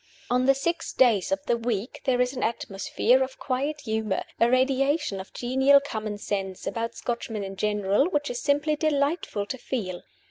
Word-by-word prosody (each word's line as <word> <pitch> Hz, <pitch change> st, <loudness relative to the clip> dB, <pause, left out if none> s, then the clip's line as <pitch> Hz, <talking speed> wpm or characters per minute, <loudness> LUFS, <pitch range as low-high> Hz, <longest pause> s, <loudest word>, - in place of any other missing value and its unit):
On 250 Hz, +1 st, +2 dB
the 275 Hz, -, +6 dB
six 335 Hz, +5 st, -2 dB
days 220 Hz, -8 st, +3 dB
of 195 Hz, 0 st, -1 dB
the 240 Hz, -, +2 dB
week 230 Hz, -1 st, -3 dB
there 255 Hz, -2 st, +2 dB
is 250 Hz, +1 st, +2 dB
an 250 Hz, -, -4 dB
atmosphere 230 Hz, +3 st, +1 dB
of 260 Hz, 0 st, -2 dB
quiet 285 Hz, +3 st, -2 dB
humor, 220 Hz, -4 st, -1 dB, 0.2 s
a 230 Hz, -, +5 dB
radiation 265 Hz, -2 st, +2 dB
of 190 Hz, -, -9 dB
genial 265 Hz, +3 st, +4 dB
common 215 Hz, -6 st, -4 dB
sense, 195 Hz, -2 st, -4 dB
about 230 Hz, 0 st, -3 dB
Scotchmen 230 Hz, -3 st, -3 dB
in 195 Hz, 0 st, -6 dB
general, 210 Hz, -, +1 dB
which 290 Hz, -6 st, -1 dB
is 245 Hz, -, -4 dB
simply 290 Hz, +1 st, +2 dB
delightful 290 Hz, -, 0 dB
to 260 Hz, +5 st, -5 dB
feel. 190 Hz, -9 st, -4 dB
245 Hz, 175 wpm, -26 LUFS, 210-275 Hz, 0.2 s, the